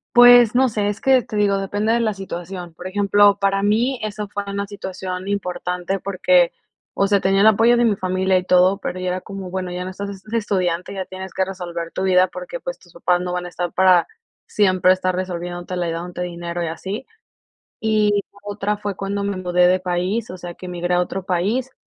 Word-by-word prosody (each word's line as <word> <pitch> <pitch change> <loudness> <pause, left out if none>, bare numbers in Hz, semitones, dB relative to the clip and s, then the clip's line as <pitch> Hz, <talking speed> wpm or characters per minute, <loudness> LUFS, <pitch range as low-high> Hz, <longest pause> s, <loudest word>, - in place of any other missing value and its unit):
Pues, 245 -1 +8
no 260 +1 +5
sé, 210 -3 -1
es 205 - -4
que, 265 -2 +4
te 210 - -6
digo, 200 -1 +2
depende 205 +3 0
de 235 - +2
la 220 -2 +1
situación. 180 -2 -7
Por 175 - -12
ejemplo, 205 +1 +4
para 195 0 +1
mí 230 +6 +2
eso 210 0 -4
fue 205 0 -4
una 200 0 -3
situación 190 -1 -6
importante 180 -1 -2
porque, 180 -2 +3 0.4
o 195 - +1
sea, 200 -1 +2
tenía 195 +1 +2
el 215 - +6
apoyo 225 +3 +5
de 240 - +3
mi 215 -3 +3
familia 185 -1 +1
y 180 - -1
todo, 185 +1 +4
pero 185 - -4
ya 185 - -3
era 180 +1 -2
como, 195 -2 -7
bueno, 185 0 -4
ya 180 0 -4
no - - -4
estás 200 +2 -6
de 215 - -16
de 230 - +3
estudiante, 185 -4 -1
ya 190 -1 -4
tienes 190 0 -8
que 190 - 0
resolver 175 -3 -6
tu 185 - -2
vida 185 -1 +4
porque, - - -7
pues, - - -6
tus 175 - -21
papás 175 +1 0
no 180 0 -3
van 180 0 -3
a - - -6
estar 175 0 -4
para 185 -2 +4 0.4
siempre 185 -3 +3
estar 185 -1 +1
resolviéndotela, 175 -1 -4
y - - -1
dándote 175 +1 -5
dinero 175 0 -5
y 170 - -1
así. 190 +9 -5 0.8
Y 210 -2 +2
la - - -19
otra 205 0 -2
fue 205 -1 -4
cuando 200 +1 -3
me 200 -1 -2
mudé 180 -1 +2
de 185 +1 +3
país, 185 +5 -2
o 185 - -8
sea, 175 -1 -7
que 180 - -9
migré 175 0 -1
a 180 - +3
otro 180 +1 -3
país. 215 +9 -1
190 Hz, 220 wpm, -21 LUFS, 180-205 Hz, 0.8 s, Pues